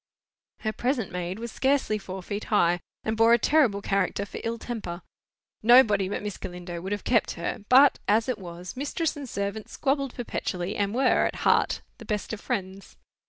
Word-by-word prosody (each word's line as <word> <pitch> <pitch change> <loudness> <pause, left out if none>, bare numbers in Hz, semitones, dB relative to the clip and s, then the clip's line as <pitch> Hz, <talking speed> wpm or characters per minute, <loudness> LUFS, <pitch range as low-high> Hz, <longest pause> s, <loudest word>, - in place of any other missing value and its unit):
Her 215 -1 -1
present 245 -3 -1
maid 180 +1 -4
was 235 +1 -6
scarcely 265 -6 +1
four 190 -1 -7
feet 205 +3 -4
high, 175 -4 +3 0.2
and 220 - -1
bore 225 +1 +5
a - - +7
terrible 235 -6 +3
character 200 0 0
for - - -8
ill 230 0 -2
temper. 210 -7 -6 0.6
Nobody 215 -5 +6
but 205 - -3
Miss 210 -2 -4
Galindo 175 -1 -7
would 190 +3 -5
have 205 -1 -2
kept 230 -4 +2
her; 170 +3 -4
but, 270 +2 +7
as 220 +2 +3
it 250 -4 -2
was, 175 -1 -8
mistress 290 +4 -2
and 280 -3 -7
servant 200 +1 -4
squabbled 275 -1 -1
perpetually, 190 -6 -3
and 205 +1 -1
were, 260 0 +3
at - - -5
heart, - - +3 0.2
the - - -10
best 210 -1 -3
of 215 - -5
friends. 190 0 -4
210 Hz, 185 wpm, -26 LUFS, 190-240 Hz, 0.6 s, a